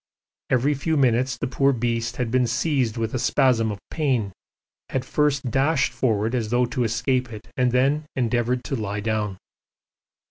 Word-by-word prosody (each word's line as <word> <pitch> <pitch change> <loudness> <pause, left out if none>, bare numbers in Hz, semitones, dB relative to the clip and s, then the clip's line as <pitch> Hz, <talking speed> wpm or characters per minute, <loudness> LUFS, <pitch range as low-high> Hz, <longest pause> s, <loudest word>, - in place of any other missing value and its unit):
Every 130 +4 +2
few 155 +3 -1
minutes 125 -1 +2
the 120 - -2
poor 135 +2 +2
beast 115 -2 -1
had 120 -3 -2
been 125 -1 +2
seized 130 -2 0
with 115 -1 -2
a 130 - -1
spasm 125 -3 +2
of 105 - -5
pain, 125 - 0 0.6
had 130 -1 -2
first 140 -3 0
dashed 140 +4 +2
forward 110 -2 0
as 115 -4 -1
though 120 +2 +2
to 120 +1 -2
escape 125 +2 0
it 105 -2 -10
and 125 -1 +2
then 140 +5 +1
endeavoured 120 0 0
to 135 - -3
lie 105 -3 -3
down. 105 -2 -2
125 Hz, 170 wpm, -24 LUFS, 115-135 Hz, 0.6 s, Every